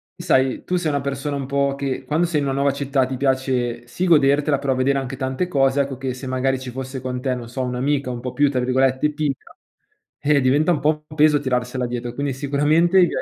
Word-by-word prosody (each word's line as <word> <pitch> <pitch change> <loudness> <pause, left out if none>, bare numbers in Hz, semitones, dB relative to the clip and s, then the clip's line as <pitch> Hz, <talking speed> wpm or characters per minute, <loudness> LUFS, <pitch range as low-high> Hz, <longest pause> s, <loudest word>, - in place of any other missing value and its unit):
sai, 130 0 +1
tu 180 - -1
sei 170 -3 -1
una 140 -1 -1
persona 140 +1 -3
un 140 -1 -3
po' 140 0 0
che 135 -1 -3
quando 155 +6 +1
sei 165 -3 0
in 145 - -1
una 135 - -1
nuova 140 0 +2
città 140 -1 0
ti 130 0 -4
piace 130 -3 0
sì 175 +10 -3
godertela, 145 -2 +3
però 135 -2 0
vedere 135 +2 +1
anche 135 0 -4
tante 130 +7 -2
cose, 135 -3 +2
ecco, 135 -1 -3
che 130 0 -3
se 130 +2 -9
magari 130 +1 0
ci 130 -1 -7
fosse 130 +1 -6
con 125 0 -4
te, 130 -1 -1
non 120 -2 -8
so, 130 +2 -3
un'amica 130 +2 -1
un 120 -1 -5
po' 125 0 -4
più 145 +2 +2
tra 130 -2 -1
virgolette 130 +3 +1
"timida", 145 -3 -3 0.7
eh, 145 0 +3
diventa 145 +6 +3
un 160 - +1
po' 150 +1 0
un 155 - -10
peso 150 0 +5
tirarsela 125 -1 -1
dietro. 120 0 -4
Quindi 140 +2 -2
sicuramente 145 +6 +2
i 180 - +6
via - - -3
135 Hz, 235 wpm, -21 LUFS, 130-145 Hz, 0.7 s, i